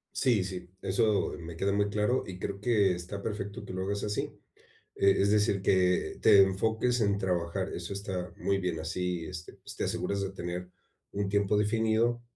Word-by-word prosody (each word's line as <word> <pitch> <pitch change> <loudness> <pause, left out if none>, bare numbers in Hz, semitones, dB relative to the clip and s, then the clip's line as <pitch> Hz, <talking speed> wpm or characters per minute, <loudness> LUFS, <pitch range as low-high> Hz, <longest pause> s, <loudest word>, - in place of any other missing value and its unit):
Sí, 120 -8 +3
sí, 90 -2 -6
eso 105 +2 +1
me 85 0 -8
queda 100 +3 +1
muy 100 0 +2
claro, 105 +5 +1
y 90 -1 -7
creo 100 +1 -5
que 105 -5 +3
está 90 +3 -6
perfecto 100 -2 -4
que - - -7
lo 95 - -3
hagas 100 +1 -2
así, 105 0 -2 0.6
eh, 100 0 +4
es 100 +1 +3
decir, 105 -2 +2
que 90 -1 +2
te 100 -1 +8
enfoques 110 +5 +1
en 100 -1 +2
trabajar, 90 0 -1
eso 85 +3 -5
está 95 -3 -4
muy 100 0 0
bien 90 -3 -2
así, 90 +1 -2
este, 90 0 -8
pues, - - -12
te - - -2
aseguras 100 0 -1
de 95 0 -2
tener 90 -1 -5 0.4
un 100 0 -1
tiempo 100 +1 +2
definido 110 +2 +2
100 Hz, 185 wpm, -30 LUFS, 90-105 Hz, 0.6 s, te